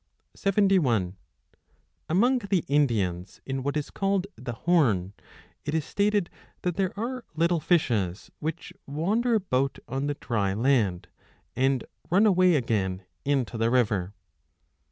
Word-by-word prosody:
5 195 0 -1
Among 175 - 0
the 200 -5 0
Indians, 105 -11 0
in 135 0 -3
what 140 +3 -1
is 150 - -3
called 195 -1 0
the 120 -1 -6
Horn, 115 - +2 0.5
it 150 +2 -2
is 160 - +1
7 200 - 0
1 - - +4
stated 205 -4 0 0.3
that 180 -2 0
there 190 -1 0
are 250 +2 -3
little 170 +1 +2
fishes, 110 - 0
which 165 +3 -5
wander 210 - +1
about 140 -10 0
on 135 +2 -2
the 145 - -1
dry 100 -7 -1
land, 110 -7 +1 0.5
and 130 -1 +2 0.3
run 195 +5 +4
away 185 -4 +5
again 100 -8 0 0.2
into 130 -5 0
the 115 +1 +2
river. 105 -6 +1
140 Hz, 135 wpm, -27 LUFS, 115-185 Hz, 0.5 s, away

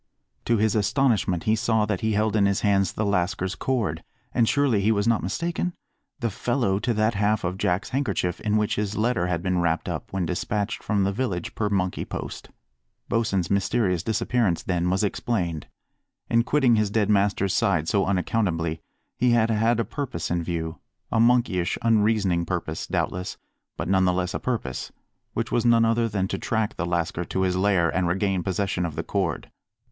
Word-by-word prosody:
To 115 - +2
his 110 0 +2
astonishment 105 -4 +1
he 110 - +2
saw 110 -1 +1
that 105 -3 -2
he 110 0 +1
held 110 +1 +1
in 100 -2 +4
his 100 -1 0
hands 100 -3 +2
the 110 - -2
lascar's 95 -1 0
cord, 105 -14 -1 0.3
and 115 -2 +3
surely 140 -8 +2
he 105 +3 +3
was 100 0 +1
not 115 -2 +3
mistaken? 170 - -2 0.5
the 115 -2 0
fellow 115 -3 0
to 120 - -1
that 110 +2 +2
half 105 +1 +1
of 90 +2 -3
Jack's 90 +6 0
handkerchief 125 -10 -1
in 105 0 +1
which 105 -1 0
his 105 0 -2
letter 110 -5 +1
had 85 -1 -2
been 90 -1 +1
wrapped 85 -2 0
up - - -5
when 95 -2 -1
despatched 100 +4 -2
from 100 -2 0
the 95 - +1
village 100 -6 -3
per 105 -2 -1
monkey 95 -3 -1
post. - - -7 0.6
Bosin's 100 -6 0
mysterious 95 -2 +1
disappearance, 110 -3 0
then, 90 -1 0
was 95 +3 +1
explained. 90 - -2 0.6
In 115 0 +5
quitting 130 -4 +3
his 105 -1 +1
dead 105 -1 +1
master's 100 -2 +2
side 80 -5 +1
so 100 +1 +1
unaccountably 90 -4 0 0.4
he 125 -1 +4
had 115 -1 +3
had 115 +2 +2
a 115 - +1
purpose 120 - -4
in 85 0 +1
view 80 -2 -4 0.3
a 115 - +2
monkeyish, 115 -7 +2
unreasoning 105 -6 +2
purpose, 85 -3 -3
doubtless, 90 0 -2 0.4
but - - -3
none 95 0 +3
the 90 - +3
less 90 0 -1
a - - -2
purpose 115 - -3 0.4
which - - -2
was 120 - +2
none 115 -1 +5
other 115 0 +2
than 100 -2 -1
to - - -3
track 110 -2 -1
the 90 - -2
lascar 85 0 -1
to 95 - -2
his 90 -1 +1
lair 95 -2 +3
and 95 -1 0
regain 95 +1 0
possession 95 -1 -1
of 80 -4 -3
the - - -3
cord. 95 -6 -2
100 Hz, 190 wpm, -25 LUFS, 90-115 Hz, 0.6 s, In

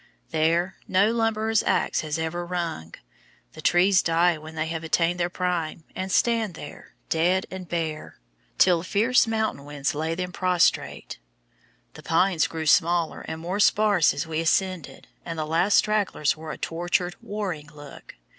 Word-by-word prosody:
There 165 +4 +1
no 195 +4 +3
lumberer's 225 -1 +1
axe - - 0
has 155 0 -3
ever 160 +2 -3
rung. 170 - -4 0.6
The 155 - -10
trees 180 +3 +4
die 170 +1 +2
when 160 +1 -11
they 155 0 -1
have 165 0 -4
attained 170 +2 +1
their 175 0 0
prime, 175 -3 -2
and 190 0 -4
stand 225 -4 +1
there, 145 - -11
dead 180 +3 +2
and 185 -2 -8
bare, 160 - -4 0.4
till 180 -2 +5
the - - -7
fierce 230 +6 +2
mountain 220 -9 -1
winds 145 -1 -3
lay 160 +2 -2
them 180 +1 -4
prostrate. 180 - 0 0.7
The - - -12
pines 165 -1 +2
grew 160 -1 -5
smaller 170 +1 +2
and 160 - -5
more 180 +5 -3
sparse 205 -4 +4
as 140 - -3
we 160 -1 -3
ascended, 180 0 -1 0.2
and 165 -1 -6
the 155 - -2
last 170 +6 +2
stragglers 210 -8 +1
wore 160 0 -8
a - - -7
tortured, 175 +1 -1
warring 185 -8 -5
look. 145 -1 -13
175 Hz, 160 wpm, -25 LUFS, 160-190 Hz, 0.7 s, till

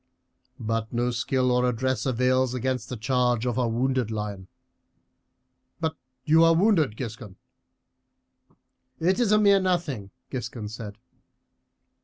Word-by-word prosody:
But 115 -1 -2
no 120 +1 0
skill 125 +1 0
or 125 0 +2
address 130 +3 -1
avails 130 0 +1
against 125 -1 -2
the 125 - -5
charge 125 0 +1
of 125 0 -1
a 125 - +2
wounded 125 0 0
lion. 105 -3 -5 1.3
But 160 -1 -1 0.3
you 160 +2 +5
are 165 0 +5
wounded, 165 - +2
Giscon." 115 -5 -7 1.6
"It 180 +5 +2
is 235 -4 +2
a 210 - +6
mere 200 -2 +5
nothing," 170 - -1 0.2
Giscon 115 -4 -5
said. 110 -2 -8
125 Hz, 125 wpm, -26 LUFS, 115-145 Hz, 1.6 s, a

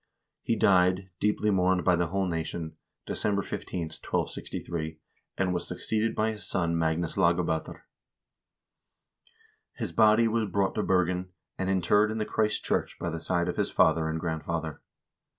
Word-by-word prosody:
1 - - -60
He 115 - +2
died, 95 -1 +3
deeply 105 0 +1
mourned 95 -1 +2
by 90 - +5
the 85 0 0
whole 95 +3 0
nation, 80 -1 -3 0.3
December 100 -1 0
15, 90 - -4 0.2
1263, 80 -2 -3 0.4
and 95 -2 +1
was 85 -1 -2
succeeded 110 +5 -1
by 110 +1 +1
his 105 -2 -7
son 85 -2 0
Magnus 80 +1 0
Lagab0ter. 85 -3 +1 1.9
His - - -4
body 110 +1 +5
was 110 -2 0
brought 95 +1 +1
to 110 - -1
Bergen, 90 -1 +1 0.3
and 95 0 -1
interred 95 +3 +3
in 110 - -3
the 110 - -1
Christ 110 0 0
church - - -1
by 85 - -3
the 80 - -4
side 85 +1 0
of 90 - -3
his - - +1
father 80 -1 +3
and 80 0 -2
grandfather. 80 -1 -3
90 Hz, 155 wpm, -28 LUFS, 85-105 Hz, 1.9 s, by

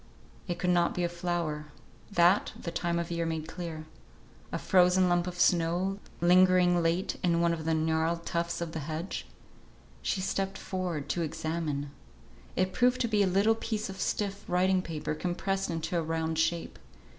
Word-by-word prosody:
It 175 - -2
could 180 - +1
not 175 -1 +2
be 180 - 0
a - - +2
flower; 170 -3 -3 0.4
that, 175 +1 +4
the 170 - -5
time 170 0 -1
of 170 0 -3
year 170 0 -1
made 160 -1 -3
clear. 165 -2 -6 0.7
A - - -1
frozen 180 0 +4
lump 175 0 +2
of 180 0 -6
snow, 180 +3 +2 0.2
lingering 180 0 +5
late 170 +3 0
in 170 -2 +2
one 170 0 +3
of 160 -2 -5
the 160 0 +2
gnarled 160 +1 0
tufts 170 0 -2
of 170 -1 -3
the 160 - -4
hedge? 155 +5 -4 0.7
She - - -1
stepped 195 +1 -1
forward 180 -6 -3
to 175 - 0
examine. 155 -3 -2 0.6
It 185 0 +1
proved 250 +1 +3
to 235 - +2
be 210 -2 +2
a 200 - +4
little 200 +4 +4
piece 215 -2 -3
of 190 - -7
stiff 200 -1 -2
writing 185 +1 +2
paper 160 -3 -4
compressed 190 +4 -2
into 165 +1 -3
a - - 0
round 160 0 -1
shape. 165 +1 -1
175 Hz, 175 wpm, -30 LUFS, 165-185 Hz, 0.7 s, lingering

